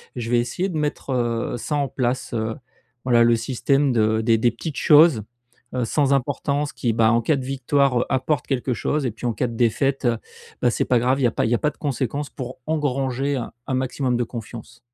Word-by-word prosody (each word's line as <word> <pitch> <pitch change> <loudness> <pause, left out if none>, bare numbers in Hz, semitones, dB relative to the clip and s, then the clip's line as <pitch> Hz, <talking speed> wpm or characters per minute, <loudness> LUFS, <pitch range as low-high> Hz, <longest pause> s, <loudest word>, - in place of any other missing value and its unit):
Je 120 -2 -4
vais 120 - +4
essayer 150 +11 -2
de 170 - -3
mettre, 150 -2 -2
heu, 120 -1 -1
ça 150 +5 -3
en 140 -1 +1
place, 130 -1 -2
heu, 110 -1 -2 0.5
voilà, 120 -2 +5
le 115 0 +4
système 135 +4 +1
de 110 -1 +2
des 115 0 +3
des 120 +1 +3
petites 140 +6 -6
choses, 150 -7 +6 0.5
heu, 125 -2 0
sans 140 +3 +2
importance 140 +2 -1
qui, 120 - -1
bah, 110 0 +4
en 115 0 +3
cas 145 +7 +2
de 130 - -5
victoire, 135 -1 +1
apportent 130 +1 0
quelque 130 -1 -1
chose 145 +4 -1
et 125 - 0
puis 110 +3 -9
en 120 - 0
cas 125 - -1
de 115 - -7
défaite, 130 +3 +1 0.5
bah, 120 - +3
c'est - - 0
pas 125 - +3
grave, 130 +3 +1
il - - 0
y - - +5
a - - -1
pas - - 0
il 110 - -1
y - - +4
a - - -1
pas 150 - +1
de - - -28
conséquences, 140 0 -2
pour 130 -2 -7
engranger 135 -3 -1 0.3
un - - -2
maximum 130 -1 -1
de 120 - +1
confiance. 115 0 -9
125 Hz, 225 wpm, -22 LUFS, 120-140 Hz, 0.5 s, choses